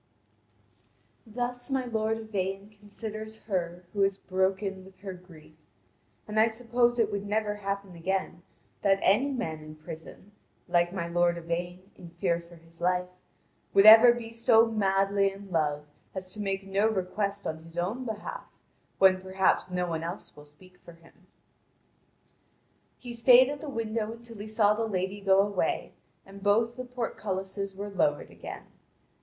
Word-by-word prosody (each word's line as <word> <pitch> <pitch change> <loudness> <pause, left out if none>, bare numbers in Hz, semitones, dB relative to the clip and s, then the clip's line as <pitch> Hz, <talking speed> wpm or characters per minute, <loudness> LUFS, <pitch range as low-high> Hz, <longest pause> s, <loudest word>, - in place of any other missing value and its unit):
Thus 245 +3 -4
my 265 -1 0
lord 225 -2 0
Yvain 200 -2 -4
considers 215 +1 -8
her 180 -3 -3
who 205 - -1
is 195 0 +2
broken 190 0 -1
with 190 0 -16
her 195 -2 -6
grief, 175 -4 -15 0.7
and 215 0 0
I 220 - +6
suppose 240 +1 +1
it 220 -3 +2
would 200 0 -3
never 210 0 0
happen 200 -1 -4
again 185 +1 -2 0.4
that 195 -1 +4
any 225 +9 +4
man 225 - -3
in 155 0 -11
prison, 160 +5 -11 0.4
like 175 -1 +2
my 175 -3 -3
lord 175 0 +2
Yvain 175 +3 -5
in 175 - -12
fear 170 -2 +1
for 175 - -13
his 165 0 -18
life, 180 0 +1 0.7
would 195 +1 +7
ever 225 +3 +11
be 235 -1 -5
so 230 0 +5
madly 195 -2 +2
in 195 0 -12
love 150 -3 0 0.3
as 185 -1 -5
to 210 - -6
make 195 -1 -2
no 195 +2 +2
request 200 0 -2
on 160 0 -4
his 165 +1 -14
own 200 +9 -1
behalf, 225 - -6 0.5
when 190 -1 +5
perhaps 190 0 +1
no 180 0 -1
one 165 -2 -3
else 170 +4 -6
will 150 - -13
speak 180 +5 -20
for 170 - -12
him. 165 0 -22 1.7
He 245 -1 -8
stayed 250 +2 +7
at 290 -1 -5
the 305 - -6
window 225 -3 -2
until 230 -2 -11
he 210 - -6
saw 215 -1 +3
the 225 +1 -1
lady 190 0 -2
go 195 0 +5
away, 200 -2 -1 0.3
and 195 0 -12
both 225 +4 +2
the 255 0 -6
portcullises 195 -5 -4
were 200 +1 -6
lowered 150 -6 0
again. - - -8
195 Hz, 160 wpm, -28 LUFS, 180-220 Hz, 1.7 s, ever